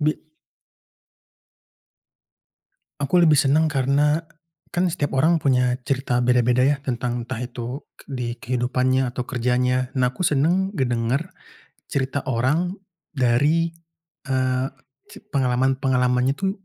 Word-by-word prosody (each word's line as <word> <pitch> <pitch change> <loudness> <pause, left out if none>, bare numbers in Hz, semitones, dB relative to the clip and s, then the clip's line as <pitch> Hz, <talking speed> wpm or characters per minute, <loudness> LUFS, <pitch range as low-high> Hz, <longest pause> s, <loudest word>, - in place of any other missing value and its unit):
Bi 155 +1 +1 2.8
Aku 140 +6 +2
lebih 165 -3 +5
senang 145 +2 +3
karena, 145 +2 +1 0.5
kan 175 +1 +1
setiap 145 -6 -1
orang 165 +5 +4
punya 125 -2 +2
cerita 125 -2 0
beda-beda 125 0 +3
ya, 140 +2 +3
tentang, 120 -3 -3
entah 115 - -5
itu 125 +2 -6 0.2
k - - -16
di 125 -4 -4
kehidupannya 125 +1 0
atau 125 - -4
kerjanya. 125 +1 0
Nah, 125 -1 +2
aku - - -4
senang 175 +5 +2
ngedenger 130 +4 -1 0.6
cerita 135 0 -2
orang 145 +9 0 0.4
dari, 145 +6 +2 0.6
eee, 130 -1 0 0.4
c - - -14
pengalaman-pengalamannya 130 -1 +1
tuh 190 +6 -1
130 Hz, 110 wpm, -23 LUFS, 125-150 Hz, 2.8 s, lebih